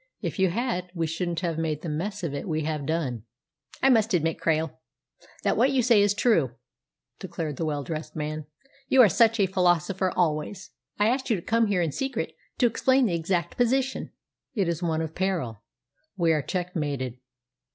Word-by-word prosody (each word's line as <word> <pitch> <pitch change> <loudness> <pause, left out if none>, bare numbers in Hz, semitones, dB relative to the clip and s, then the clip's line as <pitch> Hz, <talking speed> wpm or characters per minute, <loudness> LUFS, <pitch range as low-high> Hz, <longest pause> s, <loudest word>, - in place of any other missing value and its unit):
If - - -4
you 190 -1 +4
had, 180 -3 -2
we 165 -1 0
shouldn't 170 +1 -2
have 165 -3 -1
made 155 -2 -2
the - - -4
mess 185 +6 -3
of 160 -4 -2
it - - -2
that 140 - -6
we 155 -2 -1
have 150 -2 -3
done." 150 -8 -1 0.6
"I 270 - +6
must 220 -4 +3
admit, 165 -1 0
Krail, 160 -1 0 0.7
that - - +2
what 250 +5 +4
you 265 -2 +2
say 230 -3 +5
is 205 0 +3
true," 165 - +2 0.6
declared 165 -6 -4
the 165 - -1
well 145 -2 -2
dressed 155 0 -5
man. 155 -1 -4 0.4
"You 260 -1 +7
are 215 - +6
such 230 +5 +4
a 200 - +5
philosopher 180 0 +1
always! 175 +4 -1 0.3
I 210 - +3
asked 260 +3 0
you 225 - +3
to 180 - -4
come 230 0 +2
here 190 -4 +1
in 160 - -1
secret 265 - -3 0.2
to 250 - +3
explain 260 +3 +3
the 195 - 0
exact 170 0 -1
position." 260 +2 +1 0.5
"It 195 -5 +1
is 170 0 -1
one 160 -2 0
of 160 0 -5
peril. 165 - -2 0.6
We 170 -3 +3
are 155 - +1
checkmated. 145 -8 -3
175 Hz, 195 wpm, -26 LUFS, 155-210 Hz, 0.7 s, You